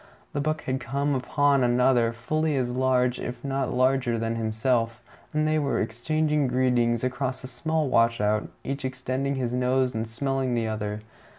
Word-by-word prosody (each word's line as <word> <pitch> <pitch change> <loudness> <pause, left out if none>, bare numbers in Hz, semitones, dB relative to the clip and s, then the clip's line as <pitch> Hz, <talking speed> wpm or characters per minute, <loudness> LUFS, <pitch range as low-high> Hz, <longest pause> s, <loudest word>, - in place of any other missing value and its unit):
The 145 - -1
buck 155 +1 -1
had 130 0 -1
come 140 +3 -1
upon 140 +1 +2
another, 120 -1 +3
fully 155 +6 -1
as 125 -2 0
large 125 -1 +2
if 120 0 -6
not 135 -1 -1
larger 130 -1 +2
than 115 0 -1
himself, 115 +1 0 0.3
and 155 0 +1
they 155 0 +2
were 140 -2 0
exchanging 150 +6 0
greetings 125 -2 +2
across 130 +1 -2
a - - -5
small 155 +5 -1
washout, 115 -3 +2
each 135 +1 -4
extending 130 +1 -2
his 125 -2 -2
nose 125 0 +1
and 110 0 -2
smelling 130 +2 -1
the 115 -1 0
other. 105 -1 -3
130 Hz, 165 wpm, -26 LUFS, 120-135 Hz, 0.3 s, another